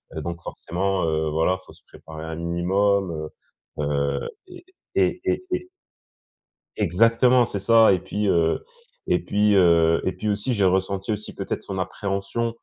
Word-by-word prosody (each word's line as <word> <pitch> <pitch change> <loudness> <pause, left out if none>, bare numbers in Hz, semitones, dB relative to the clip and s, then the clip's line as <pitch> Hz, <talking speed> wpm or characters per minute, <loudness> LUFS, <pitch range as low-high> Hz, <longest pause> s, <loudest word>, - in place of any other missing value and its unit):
heu, - - -3
donc 85 0 -5
forcément, 95 +2 -2
heu, 80 -1 0
voilà, 80 +4 +1
il - - -25
faut - - -13
se - - -21
préparer 80 0 -11
un 80 0 -5
minimum, 85 -1 0 0.5
heu - - 0
heu, 70 -1 -1 0.2
et 360 -1 -13 0.3
et 365 +1 +1
et 365 0 -2 1.1
Exactement 115 +6 +4
c'est 100 - -4
ça 115 +1 +5
et 90 - +2
puis, 105 +3 -3
heu, 85 -3 +2 0.4
et - - +2
puis, 105 0 +2
heu, 85 -3 +4
et 95 - +1
puis 110 - -3
aussi 105 +5 -1
j'ai 100 -3 +2
ressenti 95 +3 0
aussi 105 0 -4
peut-être - - -4
son 95 -1 -5
appréhension. 100 +5 -3
95 Hz, 160 wpm, -23 LUFS, 85-105 Hz, 1.1 s, ça